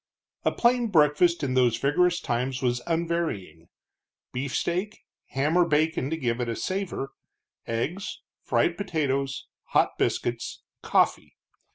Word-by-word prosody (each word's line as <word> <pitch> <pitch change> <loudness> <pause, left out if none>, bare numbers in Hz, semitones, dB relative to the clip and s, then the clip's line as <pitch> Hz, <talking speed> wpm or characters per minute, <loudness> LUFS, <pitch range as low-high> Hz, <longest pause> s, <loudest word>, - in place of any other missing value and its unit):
A - - +3
plain 240 0 +2
breakfast 165 -1 +4
in 130 -2 0
those 125 -3 +3
vigorous 175 +7 +2
times 125 +2 -1
was 125 -1 +1
unvarying 165 - -2 0.7
beefsteak, 170 - -2 0.2
ham 145 +5 0
or 180 - +6
bacon 155 -3 +1
to 160 - -1
give 120 -4 -1
it 120 - -1
a 115 - -1
savor, 185 - -3 0.6
eggs, 155 - -3 0.2
fried - - +1
potatoes, 140 -8 -1 0.2
hot - - +1
biscuits, 120 -1 -1 0.2
coffee. - - +1
150 Hz, 125 wpm, -26 LUFS, 125-175 Hz, 0.7 s, or